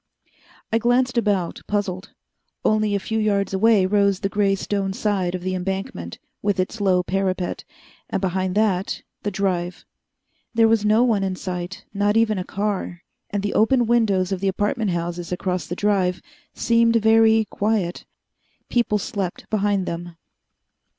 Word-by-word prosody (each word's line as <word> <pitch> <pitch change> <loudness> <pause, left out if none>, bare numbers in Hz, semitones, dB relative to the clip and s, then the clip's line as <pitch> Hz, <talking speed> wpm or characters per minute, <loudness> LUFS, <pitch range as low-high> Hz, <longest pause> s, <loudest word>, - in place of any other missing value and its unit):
I 225 - +4
glanced 245 +2 +2
about, 205 -7 0
puzzled. 200 -2 -2 0.5
Only 215 -1 +2
a - - +1
few 220 +3 -2
yards 200 -2 +1
away 205 0 +4
rose 200 -1 +2
the 195 - 0
gray 200 -1 +2
stone 195 -1 -2
side 190 -4 -1
of 180 - -6
the 185 0 -1
embankment, 185 - -4 0.2
with 205 -2 0
its 195 +4 -2
low 185 -2 +3
parapet, 185 -1 -2 0.5
and - - -1
behind 185 0 -1
that 200 -3 0 0.2
the 205 - -1
Drive. 185 -3 -2 0.7
There 225 -1 +5
was 225 -1 +3
no 215 +3 +4
one 220 -5 +2
in 190 -1 -1
sight 180 +1 -5
not 205 +1 +2
even 220 -3 +2
a - - -2
car 195 -3 -3 0.3
and 200 -1 -2
the 205 - -1
open 240 +3 +3
windows 205 -5 +2
of 190 - -1
the 195 - -1
apartment 205 +3 0
houses 175 0 -3
across 180 -2 -2
the 175 - -4
Drive 190 -3 +1 0.4
seemed 230 0 +3
very 220 0 +5
quiet. 200 -4 -1 0.7
People 235 -3 +2
slept 195 -2 -4
behind 205 -2 +1
them. 170 0 -5
200 Hz, 155 wpm, -22 LUFS, 185-215 Hz, 0.7 s, There